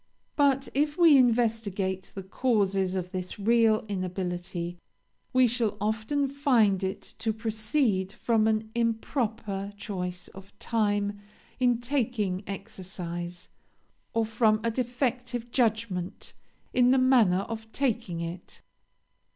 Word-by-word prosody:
But 275 -2 +3
if 295 +2 +1
we 335 -4 +7
investigate 220 -6 +1
the 195 - -5
causes 195 -3 +1
of 180 -1 -3
this 185 -1 -5
real 220 +1 +3
inability, 175 -2 -4 0.5
we 255 -1 +5
shall 230 -3 0
often 220 +7 0
find 240 -9 +2
it 190 +1 -4
to 225 0 0
proceed 220 -2 0
from 220 0 +1
an 220 0 0
improper 225 -4 -1
choice 180 -3 -5
of 195 +1 -14
time 205 -2 0 0.4
in 245 -2 +3
taking 235 -7 -1
exercise, 180 -3 -6 0.6
or 225 0 +1
from 220 -1 +2
a 230 - +1
defective 245 0 -2
judgment 220 -7 -1 0.4
in 250 0 +5
the 265 - +5
manner 240 -8 +4
of 220 +1 -7
taking 230 -11 -1
it. 170 +1 -7
220 Hz, 115 wpm, -28 LUFS, 190-245 Hz, 0.6 s, we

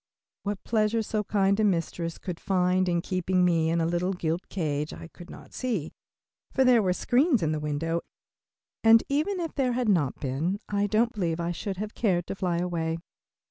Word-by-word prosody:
What 205 -1 -4
pleasure 220 0 +1
so 210 0 -1
kind 200 0 +2
a - - +3
mistress 170 -3 -1
could 180 -3 -6
find 185 -1 +1
in 170 -1 +1
keeping 185 0 +1
me 165 -2 +2
in 170 +1 +1
a 165 - +1
little 175 +3 0
gilt 170 0 -3
cage, 150 -5 -2
I 165 - -9
could 175 +1 -13
not - - -12
see, 220 - -2 0.6
for 265 - +3
there 250 -3 +5
were 185 -3 +1
screens 250 - +2
in 155 - +1
the 155 - -1
window, 155 +3 -1 0.8
and 225 0 +7
even 310 +8 0
if 330 -2 -3
there 255 -3 +1
had 245 -2 0
not 160 -9 +1
been 150 +9 -1
I 205 0 0
don't 230 +4 +2
believe 175 -6 -1
I 170 0 -1
should 190 +2 -4
have 210 +2 -4
cared 180 -6 +1
to - - -5
fly 180 -3 -1
away. 165 -2 -1
185 Hz, 195 wpm, -27 LUFS, 170-215 Hz, 0.8 s, and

